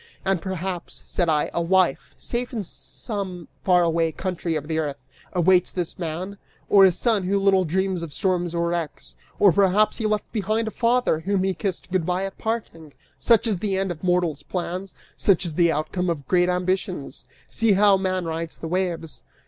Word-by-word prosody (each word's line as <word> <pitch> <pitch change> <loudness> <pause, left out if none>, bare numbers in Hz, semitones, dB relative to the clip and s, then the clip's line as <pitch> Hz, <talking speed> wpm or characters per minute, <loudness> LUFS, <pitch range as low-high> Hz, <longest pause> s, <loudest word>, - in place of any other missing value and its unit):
"And 190 -3 +1
perhaps," 185 -1 -4
said 175 -2 0
I, 150 -2 +1
"a 170 - 0
wife, 180 -3 +1
safe 240 +1 -3
in 220 -3 -2
some 190 -1 -5 0.2
far 180 -2 +4
away 165 -1 +1
country 175 -1 -3
of 150 -1 -3
the 160 0 -1
earth, 145 -3 -2 0.3
awaits 180 0 +3
this 175 -2 -4
man, 180 +4 -4 0.3
or 200 -1 +7
a 190 - +6
son 215 +3 +1
who 190 +2 0
little 195 -1 +3
dreams 190 +2 0
of 165 -3 -6
storms 175 0 0
or 170 0 +1
wrecks; 170 -3 -4 0.2
or 200 -2 +6
perhaps 200 +4 +3
he 220 - 0
left 210 -1 -1
behind 215 +1 -1
a - - -2
father, 240 -8 +2
whom 190 +3 0
he 190 0 +1
kissed 180 +2 -4
good 185 -2 +1
by 180 +2 0
at 195 - -8
parting! 165 -10 -4 0.3
Such 230 -2 +4
is 210 -6 0
the 195 -1 -1
end 195 -1 -1
of 155 -1 -8
mortal's 175 -5 +1
plans, 180 +3 -4 0.2
such 190 -2 +3
is 165 - -4
the 170 +1 +3
outcome 175 +4 -1
of 145 -6 -3
great 180 -1 +3
ambitions! 180 -3 -2 0.2
See 225 -2 +2
how 200 0 +5
man 185 -1 -1
rides 165 0 -4
the 165 - -6
waves!" 170 -2 -2
185 Hz, 190 wpm, -24 LUFS, 170-195 Hz, 0.3 s, or